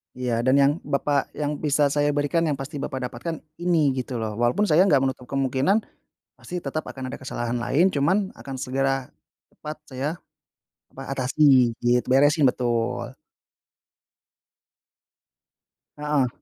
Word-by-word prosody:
Iya, 125 -2 -1
"Dan 130 - +5
yang 140 0 +5
Bapak 140 -2 0
yang 150 0 -2
bisa 145 -1 +2
saya 145 +1 +1
berikan 145 +3 +1
yang 150 - 0
pasti 135 +2 -6
Bapak 130 -2 -4
dapatkan 160 +8 -5 0.2
ini, 170 -5 +2
gitu 125 0 -5
loh. 110 -2 -2
Walaupun 120 +12 +2
saya 185 0 +4
enggak 140 -5 +4
menutup 130 -2 -3
kemungkinan 135 - +1 0.5
pasti 180 0 -6
tetap 155 +2 -4
akan 130 -1 -6
ada 140 - -6
kesalahan 120 -2 -3
lain, 140 +10 +2
cuman 190 +6 +1
akan 135 -1 -7
segera 135 0 -1 0.4
cepat 155 0 -8
saya 135 +2 -3 0.8
apa, 135 - -10
atasi." 130 -1 +4
Gitu. 120 0 +2
Beresin, 145 +1 +5
betul. 120 -1 -2 2.8
Heeh. 150 -3 +1
135 Hz, 135 wpm, -24 LUFS, 130-150 Hz, 2.8 s, Dan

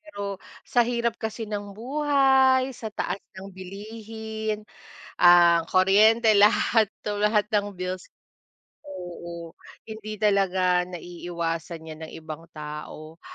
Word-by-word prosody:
pero 200 -11 -6 0.2
sa 245 - +2
hirap 235 -1 0
kasi 220 +1 -4
ng 205 -2 -6
buhay, 265 0 +3
sa 225 -3 -6
taas 205 -1 -3 0.2
ng 195 +1 -9
bilihin, 215 +3 -6 0.5
ang 175 -1 +6
kuryente, 215 +5 +5
lahat 215 +2 +4 0.2
tumaas 210 0 +1
ang 205 -1 0
bills. 185 0 -5 0.8
Oo, 170 - -8 0.3
hindi 215 -1 -7
talaga 190 -3 +2
naiiiwasan 170 -1 -5
'yan 155 0 -9
ng - - -14
ibang 160 +1 -9
tao. 150 +1 -8
205 Hz, 110 wpm, -25 LUFS, 175-220 Hz, 0.8 s, ang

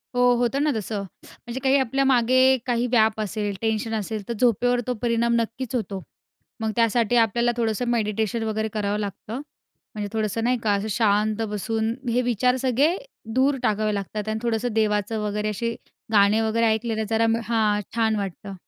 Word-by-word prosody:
हो. 245 0 +5
होतं 245 +3 0
ना 300 - +2
तसं, 210 -1 -3 0.2
म्हणजे 245 +1 -8
काही 270 +1 +4
आपल्या 270 +2 +1
मागे 255 +1 +4
काही 240 -1 0
व्याप 220 -2 +3
असेल 205 -1 -3
टेन्शन 225 0 -1
असेल 215 -1 -4
तर 235 - -2
झोपेवर 245 +1 +3
तो 250 - +1
परिणाम 235 0 +1
नक्कीच 230 +2 -3
होतो. 200 -5 -3 0.6
मग 220 -1 0
त्यासाठी 230 0 +2
आपल्याला 235 +1 +3
थोडंसं 230 +1 0
मेडिटेशन 220 -1 0
वगैरे 220 0 -1
करावं 205 -1 -1
लागतं. 210 +5 -5 0.5
म्हणजे 205 -1 -3
थोडंसं 220 0 -1
नाही 250 +1 +2
का, 210 - +2
असं 200 +2 -1
शांत 210 0 +2
बसून 220 +2 -1 0.2
हे 245 +2 +2
विचार 245 +1 +2
सगळे, 270 +7 +2 0.4
दूर 270 +2 +3
टाकावे 215 0 +1
लागतात 205 +1 -4
आणि 220 - -2
थोडंसं 230 0 -1
देवाचं 215 0 0
वगैरे 210 0 -1
अशे 230 +3 -2 0.4
गाणे 210 +1 +4
वगैरे 225 +1 +1
ऐकलेले 220 0 0
जरा 225 0 +2 0.2
हां. 215 -2 +1
छान 220 -1 +2
वाटतं. 200 0 -5
225 Hz, 165 wpm, -24 LUFS, 210-240 Hz, 0.6 s, हो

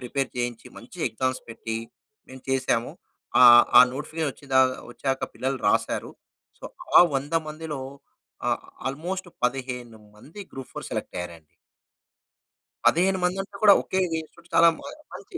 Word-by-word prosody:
Prepare 135 +2 -2
చేయించి, 120 -2 -3
మంచిగా - - -7
exams 130 +3 -2
పెట్టి 115 0 -5 0.5
మేము 130 0 -12
చేసాము. 130 -3 0 0.5
ఆహ్, 120 -1 +9
ఆ - - +12
నోటిఫికేషన్ 155 +2 -3
వచ్చిందాకా 130 -2 +2
వచ్చాక 135 +2 -2
పిల్లలు 135 +1 -2
రాసారు. - - 0 0.5
సో, - - -14 0.3
ఆ - - +11 0.2
100 145 +4 -4
మందిలో 155 -2 -6 0.7
ఆహ్, - - 0 0.3
ఆల్‌మోస్ట్ 175 +7 -5 0.2
15 125 -3 -3 0.2
మంది 155 - -12
గ్రూప్ 135 -1 -9
ఫోర్‌ - - -6
సెలెక్ట్ - - -5
అయ్యారండి. 85 -3 -8 1.3
15 185 +3 +3
మందంటే 190 +2 -2
కూడా 205 -2 +9
ఒకే 190 - -1 0.2
ఇన్‌స్టిట్యూట్ 170 +2 -18
చాలా 170 - +7 0.5
మంచి 365 - -9
135 Hz, 130 wpm, -25 LUFS, 125-165 Hz, 1.3 s, ఆ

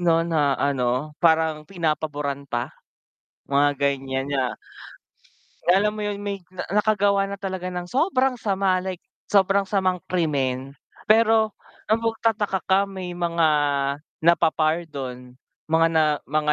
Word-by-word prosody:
'no, 165 -1 +3
na, 150 -5 +1
ano, 130 +1 0
parang 160 -2 +2
pinapaboran 150 -5 -2
pa 120 0 -3 0.7
mga 140 +1 +3
ganyan 135 0 -1
na 130 -3 0 1.1
alam 210 +4 +3
mo - - -3
yun? 205 0 -4
May 200 -1 -3 0.2
na 185 - -4 0.2
nakagawa 205 -2 +2
na 200 - -5
talaga 190 -2 -4
ng 180 -1 -5
sobrang 265 -4 +1
sama, 195 -3 +1
like 185 -1 -5 0.2
sobrang 195 0 +3
samang 185 -2 +1
krimen. 135 -6 -1 0.3
Pero 220 0 +5 0.4
ang 220 - +4
magtataka 220 -3 0
ka 190 0 +3
may 190 -2 -6
mga 170 -1 +1 0.8
napapardon, 155 -6 0 0.3
mga 160 +1 +3
na 160 -1 +3 0.3
mga 150 +1 +1
170 Hz, 125 wpm, -23 LUFS, 145-195 Hz, 1.1 s, Pero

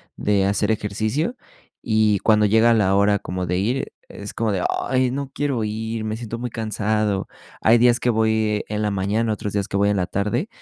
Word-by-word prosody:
de 100 -2 +1
hacer 100 +2 +1
ejercicio 110 - -1 0.5
y 110 -3 +2
cuando 105 0 +3
llega 110 +3 +4
la 100 -3 +2
hora 100 0 +3
como 90 0 -4
de 90 +1 -1
ir, 120 +8 -1 0.2
es 100 - -9
como 110 -3 -1
de: 90 - -1 0.2
''Ay, 130 -1 +1
no 140 0 -4
quiero 135 -6 -1
ir, 110 +1 -4
me 110 0 -2
siento 115 0 -6
muy 125 0 -3
cansado''. 110 -2 -1 0.3
Hay 115 +2 +5
días 120 0 +4
que 120 - 0
voy 110 -2 +1
en 105 0 -2
la 105 - +1
mañana, 105 +3 0
otros 105 -1 -4
días 100 -1 -1
que - - -5
voy 100 +1 +3
en 105 - +1
la 90 -2 0
tarde 105 - -1
110 Hz, 205 wpm, -22 LUFS, 100-115 Hz, 0.5 s, Hay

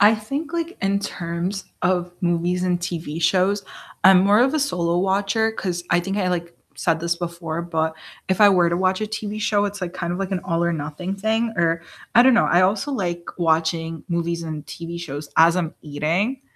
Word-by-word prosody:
I 210 +2 +7
think 275 +9 -5
like 340 +1 -3
in 195 +1 +2
terms 180 0 -4 0.2
of 180 -1 +1
movies 175 +1 0
and 180 -1 +1
TV 170 -3 -4
shows, 190 +4 +2 0.4
I'm 190 -1 +8
more 205 +3 +5
of 265 +2 +3
a - - +2
solo 175 -11 0
watcher 195 +4 +1
'cause 180 -5 -3
I 175 - +4
think 195 +3 -3
I, 185 -2 +1
like, 170 -1 -3 0.2
said 165 -2 0
this 170 +1 0
before, 170 -1 -4
but 160 -2 -1 0.3
if 190 - +1
I 205 -1 +8
were 180 -3 +4
to 170 - 0
watch 185 +1 +1
a 215 - -1
TV 215 0 -4
show, 210 -1 +2
it's 205 0 -4
like 180 -1 -4
kind 170 -1 -3
of 175 - -3
like 195 -1 -3
an 190 -2 -1
all 170 -2 0
or 170 0 +1
nothing 160 +5 -4
thing 220 +3 0
or 165 -1 +1 0.3
I 240 - +8
don't 260 0 +6
know. 230 - +4
I 175 - +4
also 200 +9 +1
like 175 -8 -2
watching 165 0 0
movies 170 -1 -1
and 155 -2 -6
TV 170 +4 -7
shows 145 -3 -6
as 165 +2 +6
I'm 170 -3 -2
eating, 170 - -1
180 Hz, 210 wpm, -22 LUFS, 170-200 Hz, 0.4 s, I'm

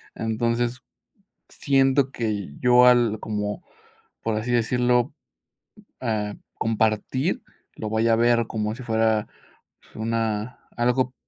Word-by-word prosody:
Entonces, 115 +3 -1 0.7
siento 135 -1 +2
que 105 -9 -3
yo 125 0 +6
al 120 -3 +4
como, 105 -1 -3 0.6
por 110 -1 -1
así 120 +3 -2
decirlo, 125 +2 +2 0.9
ah, 105 -4 -2 0.2
compartir, 110 +3 0 0.3
lo 110 - -5
vaya 115 +1 +2
a - - +5
ver 120 0 +3
como 110 0 -2
si 130 - -9
fuera 110 -2 +1 0.7
una 115 +1 -2 0.2
algo 125 +2 +1
115 Hz, 105 wpm, -24 LUFS, 110-125 Hz, 0.9 s, yo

